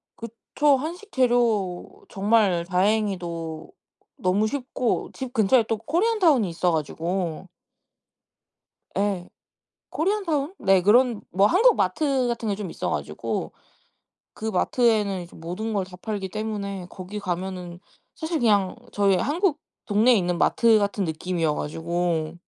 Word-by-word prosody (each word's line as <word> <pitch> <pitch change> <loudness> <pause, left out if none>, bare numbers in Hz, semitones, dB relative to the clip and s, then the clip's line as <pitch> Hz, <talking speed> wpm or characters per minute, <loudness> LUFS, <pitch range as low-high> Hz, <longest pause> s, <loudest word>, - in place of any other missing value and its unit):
그쵸. 235 +5 0
한식 355 +9 -6
재료 235 -8 0
정말 195 -4 +2
다행히도 180 -4 -1 0.5
너무 195 +4 +1
쉽고 255 -1 -2
집 260 -1 -6
근처에 225 +2 +4
또 225 - 0
코리안타운이 330 - +2
있어 175 +1 0
가지고 165 +3 -2 1.5
예. 195 -3 -1 0.6
코리안타운 335 -3 -1
네. 195 -2 +4
그런 235 +3 +4
뭐 195 +3 +4
한국 450 - +5
마트 260 - +1
같은 230 -2 -2
게 200 - 0
좀 205 -3 -5
있어 - - -3
가지고 - - -3 0.8
그 220 - -8
마트에는 210 -2 +1
이제 170 - -12
모든 180 +7 -5
걸 195 -3 0
다 180 -1 -12
팔기 200 0 -4
때문에 200 -3 -4
거기 195 +2 -7
가면은 180 -2 -4 0.4
사실 320 0 -2
그냥 205 -5 +2 0.2
저희 200 -2 +3
한국 315 - 0 0.3
동네에 225 +4 +4
있는 175 -3 0
마트 230 -2 +4
같은 200 0 -1
느낌이어 165 -1 -1
가지고 165 0 -2
205 Hz, 265 characters per minute, -24 LUFS, 180-245 Hz, 1.5 s, 한국